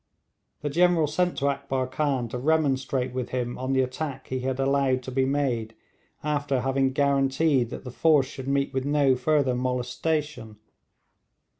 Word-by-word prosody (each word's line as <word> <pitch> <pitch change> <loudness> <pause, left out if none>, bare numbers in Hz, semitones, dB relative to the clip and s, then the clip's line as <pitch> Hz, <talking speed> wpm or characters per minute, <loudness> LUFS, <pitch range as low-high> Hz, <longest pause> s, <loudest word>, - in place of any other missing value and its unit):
The 145 - -2
General 175 0 +3
sent 175 +4 0
to 140 - 0
Akbar 135 -2 -2
Khan 130 -2 -1
to 125 - -4
remonstrate 135 -3 0
with 125 -1 -3
him 125 -1 -2
on 130 +1 -2
the 130 -1 +3
attack 135 +1 -5
he 130 - -2
had 130 +1 -2
allowed 135 -1 +1
to 130 - -6
be 130 +1 +1
made 125 -6 -1 0.5
after 145 -3 0
having 135 +1 +1
guaranteed 135 -1 +2
that - - -7
the 125 - -7
force 150 0 +3
should 130 0 -8
meet 140 0 0
with 130 0 -1
no 140 -2 +3
further 140 -1 +1
molestation. 125 0 -2
135 Hz, 160 wpm, -26 LUFS, 130-145 Hz, 0.5 s, General